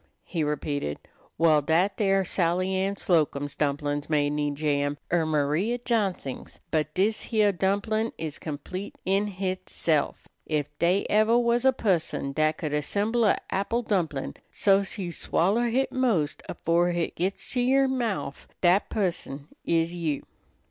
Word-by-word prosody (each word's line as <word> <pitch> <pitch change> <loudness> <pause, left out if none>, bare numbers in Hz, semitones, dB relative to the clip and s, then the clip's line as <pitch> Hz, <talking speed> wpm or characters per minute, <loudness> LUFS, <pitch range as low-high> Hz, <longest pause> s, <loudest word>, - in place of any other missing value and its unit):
he 165 -3 -2
repeated. 145 - -2 0.4
"Well, 155 -2 +5
dat 170 +7 +2
dere 195 -2 +2
Sally 180 +1 0
Ann 195 +1 0
Slocum's 145 -6 +1
dumplin's 145 0 -1
may 145 -2 +2
need 145 -1 -1
jam, 145 -1 0 0.2
er 165 -2 +3
Maria 155 +10 +1
Johnsing's, 205 - -2
but 155 -1 0
dis 210 +3 +1
heah 215 -3 +3
dumplin' 205 +4 0
is 155 -2 -5
complete 165 +6 -6
in 195 +2 +2
hitself. 185 -5 -1 0.2
Ef 150 -2 +1
dey 180 +4 +2
ever 215 +3 +4
was 240 +1 +2
a 265 - +7
pusson 175 - 0
dat 155 +1 +1
could 150 -2 -3
assemble 205 +10 +1
a' 205 - +4
apple 230 +5 0
dumplin' 170 -10 -1 0.2
so's 195 +1 +2
you 180 -4 -3
swoller 205 +8 +1
hit 260 +4 +1
'most 225 - +1
afore 170 +2 +1
hit 170 -1 -2
gits 185 +3 -2
to 250 - 0
yer 270 +2 +4
mouf, 225 - -2
dat 180 +3 +4
pusson 165 -8 -3 0.2
is 165 0 +1
you." 160 -5 -2
175 Hz, 145 wpm, -26 LUFS, 150-205 Hz, 0.4 s, a